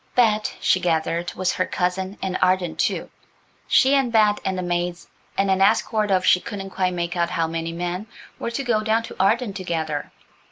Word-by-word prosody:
Bet, 215 -3 +2
she 185 - +3
gathered, 170 0 0
was 185 0 0
her 185 - -1
cousin–an 185 +1 -2
Arden, 180 -2 +1
too, - - -1 0.6
She 265 +1 +4
and 270 -4 +2
Bet 210 -2 +4
and 190 -1 -1
the 185 - -2
maids, 175 0 -2 0.3
and 195 0 +2
an 190 0 +2
escort 215 +1 +2
of 185 -1 +2
she 180 - +5
couldn't 195 -1 -7
quite 185 -1 0
make 170 0 -2
out 170 -1 +1
how 165 -1 0
many 165 0 -3
men, 175 +4 -4 0.3
were - - -2
to 235 +4 -3
go 235 -4 +1
down 220 +1 +1
to - - -9
Arden 210 +3 +2
together. 160 -6 -3
185 Hz, 190 wpm, -23 LUFS, 175-215 Hz, 0.6 s, she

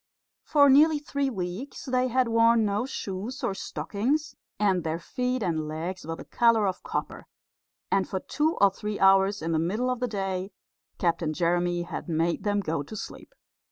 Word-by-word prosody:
For 285 -2 +4
nearly 300 +3 +6
three 280 -1 -2
weeks 195 +4 -5
they 255 -1 +1
had 255 0 +2
worn 230 0 +4
no 210 +4 -1
shoes 215 0 -5
or - - 0
stockings, 270 +11 -2 0.3
and 190 -4 +2
their 160 0 -1
feet 250 +7 -2
and 160 -4 -1
legs 165 +3 -5
were 165 - -3
the - - -10
colour 230 -3 +3
of 185 -2 -2
copper; - - -5 0.6
and 195 -1 +1
for 190 - -2
two 310 - -1
or 200 -1 +6
three 210 +2 -5
hours 195 0 +4
in 165 - -1
the 160 - +2
middle 215 +10 0
of 250 - -2
the 250 - 0
day 195 -2 -3 0.4
Captain 165 -3 0
Jeremy 175 +1 +1
had 175 +1 -6
made 165 +1 0
them 205 -1 +1
go 160 -5 -2
to 145 +9 -8
sleep. 215 - -8
200 Hz, 180 wpm, -27 LUFS, 175-250 Hz, 0.6 s, nearly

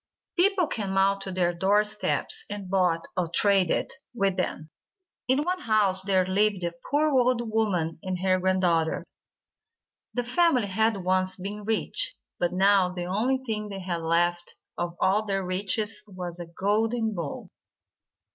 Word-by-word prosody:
People 380 0 +3
came 200 -8 -3
out 195 +1 +3
to 195 - -5
their 180 -1 +1
door 195 +4 +3
steps, 210 0 0
and 200 -2 -6
bought, 180 -4 +2
or 180 -2 0
traded, 190 +1 +2 0.2
with 195 -4 +1
them. 155 -3 -3 0.6
In 265 +3 +2
one 365 +3 -1
house 210 - +3
there 190 -1 +2
lived 195 0 +1
a 170 0 -2 0.2
poor 300 +2 +2
old 245 -3 +2
woman 180 -8 0
and 185 -1 -3
her 185 -1 +2
granddaughter. 180 -3 +1 1.1
The 245 - 0
family 255 -1 +2
had 220 0 +1
once 185 0 +1
been 205 +2 -6
rich, 225 - -1 0.2
but 175 - +1
now 190 0 +3
the 180 -1 -5
only 240 +8 0
thing 215 -3 -3
they 195 -1 -6
had 175 -2 -3
left 175 +1 0 0.2
of 175 0 -3
all 205 +3 +2
their 195 -2 -2
riches 205 +4 -2
was 180 -3 -7
a 175 - -6
golden 220 +5 0
bowl. 170 -7 -6
195 Hz, 155 wpm, -26 LUFS, 180-220 Hz, 1.1 s, People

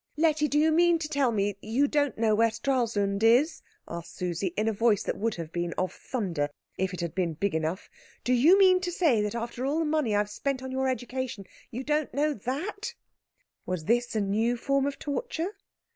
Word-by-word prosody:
"Letty, 305 -1 +3
do 295 - 0
you 315 +1 +4
mean 340 +1 +4
to 320 -1 -4
tell 280 -5 +1
me 205 -2 +1
that 200 - -19
you 245 +7 +2
don't 285 -1 0
know 220 -1 +2
where 230 +2 +4
Stralsund 225 -4 0
is?" 245 +8 +4 0.3
asked 170 0 -7
Susie, 180 +1 -2
in 215 +1 +1
a 225 - +2
voice 215 -1 +2
that - - -2
would 225 +1 0
have 165 -2 -6
been 175 0 -2
of 185 - -1
thunder 175 - -2 0.3
if 190 0 -1
it 180 - -5
had 170 -2 -3
been 175 -3 0
big 200 +4 -1
enough. 160 +3 -2 0.4
"Do 250 - +2
you 300 +10 +6
mean 370 -2 +6
to 360 -1 -2
say 310 - +3
that 210 +1 -2
after 235 +1 -4
all 280 +4 0
the 325 - +1
money 300 -8 +1
I - - +4
have 205 0 0
spent 260 +4 -2
on 260 - -5
your 265 0 0
education 255 -4 -4 0.2
you 250 +3 -5
don't 300 -2 -1
know 300 +1 +2
that?" 295 - -4 0.7
Was 180 -4 -3
this 240 +3 +1
a 215 - +2
new 220 +5 +1
form 275 +3 +1
of 280 -1 -3
torture? 345 - -3
240 Hz, 220 wpm, -28 LUFS, 200-290 Hz, 0.7 s, you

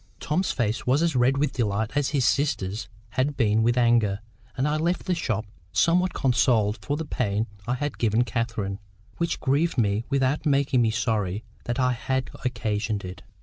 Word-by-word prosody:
Tom's 180 +5 0
face 115 -2 -1
was 135 +6 +3
as 165 -4 +1
red 125 +2 +3
with 140 -1 0
delight 110 -2 -1
as 145 -2 +1
his 135 -5 +2
sister's 105 -9 0 0.2
had 135 +4 -1
been 110 -3 +3
with 120 +2 +2
anger. 115 -5 +3 0.4
And 130 +3 +1
I 150 +1 +1
left 170 +3 -1
the 185 - +1
shop 115 - -1 0.3
somewhat 180 +2 +3
consoled 115 -5 +2
for 145 0 -2
the 160 - -4
pain 110 -6 -1 0.2
I 125 - +1
had 145 +2 -4
given 115 +1 +3
Catherine, 115 -5 -2 0.4
which 170 0 -1
grieved 145 +4 +1
me 105 -1 +1
without 140 +1 +1
making 140 -3 +2
me 115 - +3
sorry 110 -3 -1 0.2
that 120 +2 -2
I 125 0 +3
had 130 +1 -2
occasioned 110 -5 -2
it. 90 0 -8
125 Hz, 180 wpm, -25 LUFS, 110-140 Hz, 0.4 s, was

